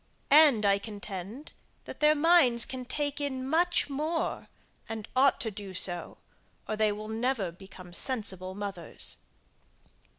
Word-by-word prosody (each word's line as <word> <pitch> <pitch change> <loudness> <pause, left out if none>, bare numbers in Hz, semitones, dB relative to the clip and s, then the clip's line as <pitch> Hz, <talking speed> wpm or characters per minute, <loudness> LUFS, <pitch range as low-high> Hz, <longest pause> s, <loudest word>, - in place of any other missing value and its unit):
And 285 -8 +7
I 200 0 +4
contend, 205 - -7 0.3
that - - -9
their 300 0 +5
minds 290 -7 +4
can 255 -1 -5
take 290 +2 -2
in 265 -2 -3
much 345 +4 +2
more, 305 +4 -2 0.4
and 225 -1 -5
ought 270 +2 +4
to 220 - -2
do 195 -2 -8
so, 175 -1 0 0.5
or 215 - -2
they 215 0 +2
will 210 +1 -6
never 220 -4 -1
become 185 0 -13
sensible 190 -5 -2
mothers. 195 -5 -3
225 Hz, 135 wpm, -29 LUFS, 200-280 Hz, 0.5 s, And